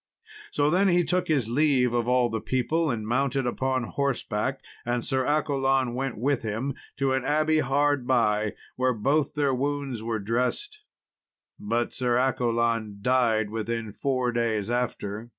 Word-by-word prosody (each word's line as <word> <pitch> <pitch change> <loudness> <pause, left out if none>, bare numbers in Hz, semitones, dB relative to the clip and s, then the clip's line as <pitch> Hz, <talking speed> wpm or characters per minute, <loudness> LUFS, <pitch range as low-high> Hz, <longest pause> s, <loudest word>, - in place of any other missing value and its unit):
So 145 +1 +1
then 190 +4 +3
he 175 -1 +4
took 180 +1 0
his 140 -8 +1
leave 130 -1 +2
of 120 -1 0
all 125 -1 +3
the 110 -1 -3
people 155 +6 0
and 110 -4 -3
mounted 135 +2 0
upon 130 +1 0
horseback, 130 -2 -2 0.2
and 120 0 -2
Sir 130 -2 0
Accolon 135 -3 +1
went 135 0 -3
with 135 +4 0
him 115 +5 -2 0.2
to 135 -1 +1
an 130 -1 0
abbey 155 +3 +2
hard 140 -1 +1
by, 110 -4 +2 0.2
where 130 0 +2
both 140 +7 0
their 145 -2 +1
wounds 140 -2 -2
were 115 0 -2
dressed. 125 - -2 0.8
But 115 +3 -1
Sir 125 -2 +1
Accolon 115 -4 0
died 115 -4 +2
within 115 0 -3
four 130 -1 0
days 115 -2 -1
after. 115 -2 -3
125 Hz, 150 wpm, -26 LUFS, 115-140 Hz, 0.8 s, he